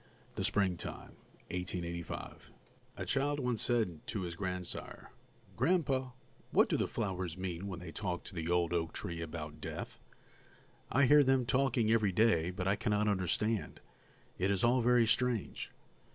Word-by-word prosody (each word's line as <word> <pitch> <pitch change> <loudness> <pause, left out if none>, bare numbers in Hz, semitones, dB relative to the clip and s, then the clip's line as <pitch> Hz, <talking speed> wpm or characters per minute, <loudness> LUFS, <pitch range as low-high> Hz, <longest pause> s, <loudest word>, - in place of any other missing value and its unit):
+THE - - -3
SPRINGTIME+ 95 -4 -1 0.4
THE 90 +1 -2
SPRINGTIME 85 -1 -5 0.6
A - - -3
child 145 +1 +1
once 125 -4 0
said 110 -10 +1
to 105 - -2
his 85 -2 -4
grandsire: 90 -1 -5 0.4
"Gran'pa, 135 -8 +1 0.4
what - - +4
do - - +2
the - - +1
flowers 90 -3 -3
mean 95 0 -4
when 90 -3 -5
they 90 -2 -8
talk 90 -1 -3
to - - -10
the 85 -2 -3
old 90 -1 +2
oak 80 -1 -1
tree 85 -1 -4
about 80 -2 -6
death? - - -6 0.9
I 140 +2 +5
hear 145 +3 +7
them 130 -2 +3
talking 125 -3 +2
every 110 -4 +3
day, 90 -4 +3
but 90 0 -3
I 100 - +3
cannot 105 0 +1
understand; 105 +3 0 0.6
it 95 - +2
is 100 -2 +1
all 125 +2 +4
very 120 0 +5
strange." 120 -1 0
100 Hz, 155 wpm, -33 LUFS, 90-120 Hz, 0.9 s, hear